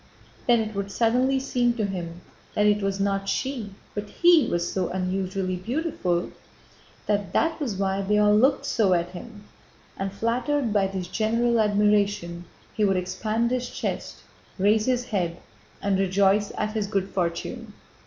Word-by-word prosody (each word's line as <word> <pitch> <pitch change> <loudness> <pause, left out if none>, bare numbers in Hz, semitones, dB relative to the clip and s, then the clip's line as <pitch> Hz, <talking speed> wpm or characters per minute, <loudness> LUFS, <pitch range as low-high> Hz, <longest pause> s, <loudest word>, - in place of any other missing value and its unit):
Then 240 -2 +5
it 220 0 -4
would 200 0 -3
suddenly 250 +5 +2
seem 245 -3 +1
to 220 -3 0
him 175 -3 -5 0.3
that 210 - +3
it 210 0 +3
was 195 0 -1
not 195 0 0
she 240 -7 -3 0.2
but 205 0 -5
he 345 -3 +5
was 170 0 -1
so 185 -2 -1
unusually 185 0 -2
beautiful, 220 - -1
and - - -8 0.7
that 200 -3 -1
that 325 +1 +1
was 240 -9 -2
why 195 0 0
they 210 +2 +1
all 210 0 +5
looked 265 +6 +3
so 195 -5 +2
at 170 0 -1
him, 205 +4 -10 0.5
and 195 0 -3
flattered 235 +4 0
by 200 -2 +3
this 190 -2 -4
general 230 +3 +1
admiration 205 -4 +1 0.3
he 215 - 0
would 195 -2 +3
expand 215 +6 -1
his 250 -1 -1
chest, - - -5 0.3
raise 210 +3 +3
his 250 -1 +1
head, 180 -7 -2 0.5
and 200 -1 +1
rejoice 195 +2 +2
at 215 0 -1
his 215 -2 -1
good 195 -2 -1
fortune. 195 +6 -3
205 Hz, 165 wpm, -25 LUFS, 190-230 Hz, 0.7 s, Then